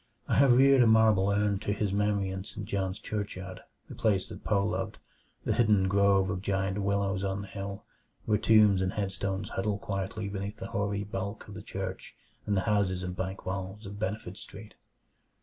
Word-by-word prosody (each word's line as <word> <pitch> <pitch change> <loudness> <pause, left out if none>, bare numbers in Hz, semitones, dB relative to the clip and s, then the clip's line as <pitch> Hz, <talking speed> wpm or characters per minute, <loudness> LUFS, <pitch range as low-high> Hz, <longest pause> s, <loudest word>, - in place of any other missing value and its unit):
I - - 0
have 135 -3 +6
reared 135 +1 +6
a 120 - +6
marble 110 -3 +5
urn 100 -1 +1
to 100 0 -1
his 100 -1 -1
memory 100 -1 +1
in 95 0 -4
St. 100 0 -7
John's 95 -2 -2
churchyard 95 -3 -5 0.3
the - - -9
place 100 -4 +1
that - - -9
Poe 100 -2 +2
loved 105 - -2 0.5
the - - +2
hidden 105 -5 +3
grove 100 -1 +3
of 95 -1 -3
giant 95 0 -1
willows 100 -1 0
on 95 0 -1
the 100 - -8
hill, 100 0 -6 0.4
where 105 -2 +2
tombs 105 -4 +5
and 95 0 0
headstones 95 -1 -2
huddle 100 +1 -1
quietly 100 +1 -3
between 100 +1 -4
the - - -6
hoary 100 0 -1
bulk 100 0 -5
of 105 - -9
the 105 - -7
church 95 -2 -6 0.3
and 100 -1 +1
the - - +2
houses 100 -4 +1
and 90 0 -4
bank 95 +1 -4
walls 95 +3 -4
of 100 +1 -8
Benefit 100 -2 -3
Street. 105 +2 -11
100 Hz, 190 wpm, -29 LUFS, 95-105 Hz, 0.5 s, have